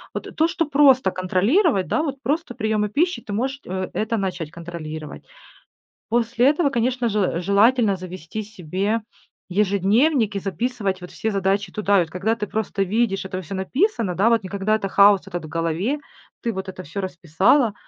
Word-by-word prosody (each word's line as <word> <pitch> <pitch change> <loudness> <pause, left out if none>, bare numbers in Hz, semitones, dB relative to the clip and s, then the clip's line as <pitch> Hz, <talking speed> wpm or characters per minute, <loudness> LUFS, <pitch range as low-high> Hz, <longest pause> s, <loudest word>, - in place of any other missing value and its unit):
Вот - - -6
то, 320 - +3
что 340 -1 -1
просто 275 -6 +5
контролировать, 195 - +2
да, - - +1
вот 280 -4 -2
просто 295 -1 -1
приемы 215 -2 0
пищи, 345 - 0
ты 210 - -9
можешь, 265 +6 -2
э, 185 0 -3
это 225 +1 -1
начать 185 -5 -3
контролировать. 160 -3 -7 0.9
После 235 +2 +2
этого, 300 0 +2
конечно 245 -1 0
же, 210 0 0
э, 180 -3 0
желательно 205 +3 +3
завести 185 +2 -7
себе 200 +2 -2 0.5
ежедневник 205 - +2
и - - 0
записывать 200 -1 -2
вот 180 - -8
все 220 - -2
задачи 195 -1 0
туда. 205 0 +2
И - - +5
вот 165 -2 -4
когда 200 +5 0
ты 210 - -3
просто 205 -2 -1
видишь, 195 0 0
это 185 0 -4
всё 185 +3 -7
написано, 230 - 0
да? 205 +6 +3
Вот 230 -2 +2
не 185 - -7
когда 200 +2 0
это 205 -2 -2
хаос 200 0 +5
этот 175 -4 -5
в - - -8
голове. 165 - -1 0.4
Ты 235 - -1
вот 190 0 -5
это 185 0 -8
всё 170 +6 -5
расписала, 190 - +2
205 Hz, 180 wpm, -22 LUFS, 185-240 Hz, 0.9 s, просто